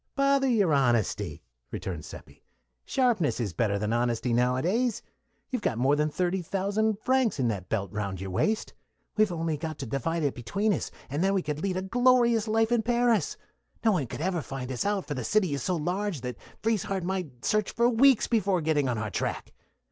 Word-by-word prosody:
"Bother 275 0 +3
your 205 - +3
honesty," 120 -6 +1 0.3
returned 85 -6 -5
Seppi. - - -12 0.4
"Sharpness 240 - +1
is 105 -7 -2
better 100 +2 +1
than 105 +2 -1
honesty 120 0 0
nowadays. 165 - +1 0.5
You've 250 -3 -1
got 125 - -1
more 135 +4 +3
than 150 +1 +1
thirty 180 +4 -1
thousand 200 +4 0
francs 260 - +2
in 125 -3 +2
that 95 -4 -4
belt 100 -3 -2
round 100 -3 -3
your 95 0 -5
waist; 215 - 0 0.4
we've 215 -3 +3
only 165 -2 -1
got 155 0 -5
to 135 - -5
divide 150 +7 -2
it 140 - +1
between 200 - 0
us, 160 - -3 0.2
and 145 +6 -2
then 195 +1 +2
we 190 - +1
could 150 0 -3
lead 185 -1 -1
a 185 - -2
glorious 235 +1 +3
life 225 +1 +2
in 240 -2 +3
Paris. 240 -1 +1 0.5
No 220 - +6
one 160 -10 0
could 140 - -6
ever 180 -1 0
find 135 -2 -6
us 130 +9 -1
out, 205 -2 0
for 145 - -4
the 130 -3 -4
city 190 - +2
is 140 - -2
so 185 - 0
large 180 0 -2
that 125 -2 -5 0.2
Frieshardt 200 -4 0
might 175 -9 -4
search 215 -1 +1
for 235 0 +2
weeks 250 +1 +5
before 200 -5 +1
getting 150 -4 +1
on 120 - -1
our 110 -1 -3
track. - - -3
175 Hz, 200 wpm, -28 LUFS, -, 0.5 s, No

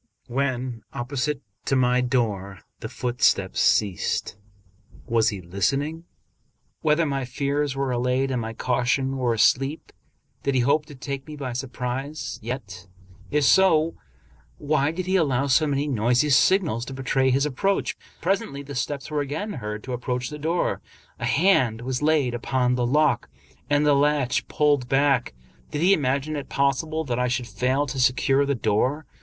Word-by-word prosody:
When 125 -2 -2
opposite 135 +3 -2 0.2
to 135 - +1
my 125 -1 +3
door 105 -7 -1 0.2
the - - -6
footsteps 125 0 +1
ceased. 100 -1 +1 0.7
Was 115 -1 +2
he 100 -3 -5
listening 140 - -1 0.8
whether 155 +2 +3
my 140 -2 -1
fears 140 +2 -1
were 135 -1 -1
allayed 125 +2 0
and 125 -2 -1
my 110 0 -5
caution 130 +3 0
were 120 -3 +1
asleep? 135 +7 +1 0.5
Did 140 -1 -1
he 130 - +3
hope 145 +4 +2
to 145 - -11
take 135 0 -6
me 155 - -7
by 135 -4 -5
surprise? 130 +3 -4
Yet, 105 -5 -6 0.4
if 150 +6 +1
so, 165 0 +4 0.6
why 145 -1 +1
did 180 +2 -4
he 190 +1 +2
allow 140 -6 +1
so 140 +3 +3
many 145 +1 0
noisy 125 +3 +2
signals 140 - +3
to 135 - -7
betray 135 0 +1
his 135 +3 +2
approach? 195 +8 0 0.3
Presently 190 -6 -1
the 140 0 -8
steps 140 +3 -3
were 150 -1 0
again 155 +10 -4
heard 105 -5 -5
to 130 - -5
approach 125 +1 -3
the 150 - -7
door. 165 +4 -1 0.4
A 120 - -2
hand 130 - +3
was 125 +1 -3
laid 150 -5 +2
upon 125 +1 0
the 125 -1 0
lock, 140 - +2 0.4
and 145 0 +3
the 145 - +5
latch 140 -2 +1
pulled 145 -5 +1
back. 135 - +2 0.3
Did 150 +2 -2
he 190 +2 +6
imagine 140 0 0
it 145 - -5
possible 140 +4 0
that 125 -4 -2
I 125 - +1
should 125 0 -1
fail 130 +4 0
to 135 -1 -5
secure 135 +2 +3
the 140 - +1
door? 125 +7 0
135 Hz, 160 wpm, -24 LUFS, 125-150 Hz, 0.8 s, he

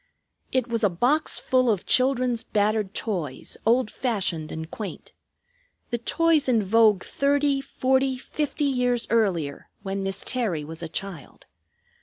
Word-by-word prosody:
It 255 -2 +1
was 230 -1 -1
a 205 - +5
box 250 - +2
full 255 -1 +2
of 205 -5 0
children's 255 -2 +2
battered 210 -1 0
toys, 170 - -3
old 235 -1 +3
fashioned 190 -10 -2
and 160 +1 -6
quaint; 210 -3 -7 0.8
the 235 - -1
toys 310 +3 +2
in 230 -4 +3
vogue 210 -1 +4
thirty 280 0 +1
forty 265 0 0
fifty 295 +3 -3
years 250 -3 +1
earlier, 180 -11 0
when 195 0 -3
Miss 195 0 -3
Terry 215 -12 -1
was 160 +2 -8
a 165 - -5
child. 180 -6 -7
230 Hz, 140 wpm, -25 LUFS, 195-255 Hz, 0.8 s, a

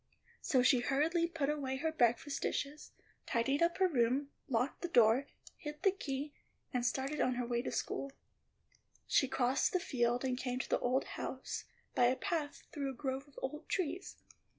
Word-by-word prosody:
So 255 -2 +3
she 255 0 +5
hurriedly 310 +7 +2
put 325 -5 -1
away 280 -3 -1
her 320 +4 0
breakfast 270 0 +1
dishes, 290 +2 -3 0.4
tidied 270 +5 +1
up 340 0 +3
her 380 -1 +4
room, 270 -1 +1 0.2
locked 250 +2 0
the 350 - -1
door, 245 -2 +5 0.3
hid 295 -1 -7
the 390 - +6
key, 290 -6 -4 0.4
and 250 -1 +1
started 265 +5 0
on 255 - +2
her 245 0 -1
way 240 0 0
to - - -4
school. 275 - -2 0.9
She 270 - +3
crossed 260 0 +1
the 365 - +3
field 245 -5 0
and 255 -1 0
came 250 -1 -2
to 260 - -3
the - - +3
old 255 +2 +2
house 265 - -5 0.3
by 245 - +4
a 250 +2 +4
path 325 -4 -2
through 280 -2 -2
a 265 - -5
grove 265 +1 -3
of 285 - -22
old 300 +4 -4
trees. 365 0 -2
270 Hz, 180 wpm, -35 LUFS, 250-300 Hz, 0.9 s, the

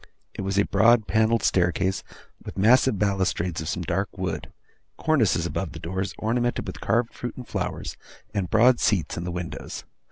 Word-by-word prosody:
It - - -5
was 95 0 -2
a 100 - +4
broad 110 +2 +4
panelled 110 +1 +2
staircase, 95 +1 +1 0.4
with - - -8
massive 115 +3 +4
balustrades 95 -4 0
of 80 - -4
some 90 - -2
dark 95 +5 -2
wood; 90 -4 -3 0.5
cornices 115 - +2
above 85 0 -3
the 80 - -7
doors, 95 +4 -3
ornamented 120 +2 0
with - - -7
carved 115 +1 +1
fruit 120 - -6
and 125 - -8
flowers; - - -4 0.4
and 95 -4 -1
broad 120 +3 +5
seats 95 -6 +1
in 85 - -4
the 90 - -3
windows. 85 -1 -6
100 Hz, 170 wpm, -25 LUFS, 90-115 Hz, 0.5 s, broad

